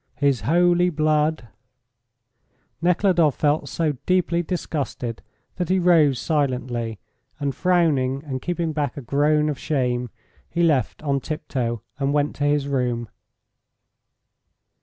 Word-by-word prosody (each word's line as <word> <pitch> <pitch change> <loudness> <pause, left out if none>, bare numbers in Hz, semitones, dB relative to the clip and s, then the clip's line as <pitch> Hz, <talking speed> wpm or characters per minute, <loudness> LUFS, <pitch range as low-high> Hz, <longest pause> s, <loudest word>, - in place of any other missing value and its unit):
His 140 -4 +1
holy 175 +1 +4
blood.. 155 -4 +1 0.6
." 120 +5 -46
Nekhludoff 175 -4 +3
felt 150 +1 +1
so 155 -4 -1
deeply 180 -2 +2
disgusted 145 -9 -4 0.4
that 180 -1 -2
he 190 - +3
rose 165 -7 +4
silently, 125 -6 -1 0.4
and 140 -1 -1
frowning 150 -7 +1
and 130 -3 -4
keeping 170 -2 -2
back 145 -3 -2
a - - -4
groan 150 +4 +2
of 150 -3 -2
shame, 125 -4 -1 0.4
he 170 - 0
left 150 -3 +1
on 140 -2 +1
tiptoe, 125 -7 -3 0.2
and 140 0 0
went 145 0 +1
to 145 - 0
his 145 -1 +1
room. 125 -4 -1
145 Hz, 125 wpm, -23 LUFS, 130-165 Hz, 0.6 s, holy